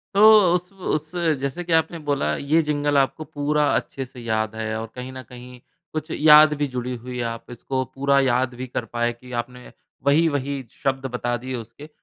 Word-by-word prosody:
तो 205 - +4 0.3
उसव 180 +2 -2 0.2
उस 155 0 -2 0.3
जैसे 140 +6 -3
कि 170 -1 -2
आपने 160 +1 +1
बोला 145 -1 +1
ये 155 +4 +2
जिंगल 145 -1 0
आपको 140 +3 +1
पूरा 150 0 0
अच्छे 135 - -3
से 125 0 -14
याद 110 -1 -1
है 110 0 -3
और 115 - -5
कहीं 125 +1 -6
न 130 - -7
कहीं 125 0 -11 0.3
कुछ 155 +1 -4
याद 150 0 +7
भी 145 - +2
जुड़ी 125 0 -3
हुई 125 +1 -7
है। 120 - -1
आप 115 0 -5
इसको 130 +2 -3
पूरा 140 0 +3
याद 130 -1 +1
भी 130 +1 -6
कर 120 -1 -4
पाए 120 0 -1
कि 125 +1 -15
आपने 125 +1 -14 0.3
वही-वही 140 -2 +1
शब्द 135 0 -2
बता 120 0 -1
दिए 130 +2 -5
उसके। 120 +6 -9
135 Hz, 195 wpm, -23 LUFS, 125-150 Hz, 0.3 s, याद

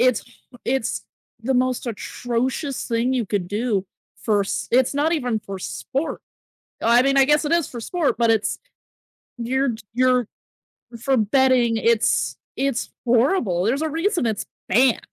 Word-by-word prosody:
it's 250 -2 +4
h 245 - -21 0.3
it's 260 -3 -1 0.4
the 265 +2 0
most 255 0 0
atrocious 245 +4 -2
thing 235 +2 +1
you 240 -5 0
could 185 -4 -2
do 205 -2 -1 0.4
for 210 -3 +2
s 195 - -2
it's 255 +3 +3
not 305 +4 +2
even 245 -8 0
for 195 -1 -7
sport. 275 - -4 0.6
I 235 +2 +5
mean, 275 0 +2
I 270 - +7
guess 295 +2 +3
it 300 - -1
is 340 -3 +2
for 240 - -7
sport, 330 +2 0
but 230 -1 +3
it's 220 -2 +1 0.8
you're 250 +1 0 0.2
you're 250 -2 +3 0.7
for 270 +2 +2
betting, 240 +1 +3
it's, 230 0 +2 0.2
it's 275 -3 -1
horrible. 235 - +2
There's 260 +8 +1
a 315 - 0
reason 335 - 0
it's 220 -2 -1 0.2
banned. 245 +4 +4
250 Hz, 155 wpm, -22 LUFS, 230-270 Hz, 0.8 s, I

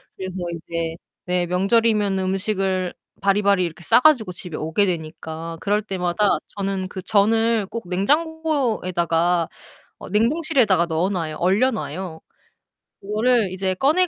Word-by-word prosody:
그래서 185 -1 -6 0.2
이제 165 0 -4 0.3
네 180 0 0
명절이면은 200 +1 +2
음식을 190 -1 -1 0.3
바리바리 200 -1 +3
이렇게 170 0 -7
싸 - - +5
가지고 255 -9 +4
집에 175 -2 -8
오게 160 +6 +1
되니까 165 -1 -5
그럴 205 +3 +1
때마다 190 0 0 0.2
저는 195 -1 -2
그 190 -1 -7
전을 225 +2 +2
꼭 210 -2 -7
냉장고에다가 195 - +1 0.5
어 - - -9
냉동실에다가 230 - +2
넣어놔요. 165 -1 -1
얼려놔요. 185 - 0 0.8
그거를 215 0 +1
이제 190 0 -1
꺼내 310 - +3
195 Hz, 305 characters per minute, -22 LUFS, 175-220 Hz, 0.8 s, 싸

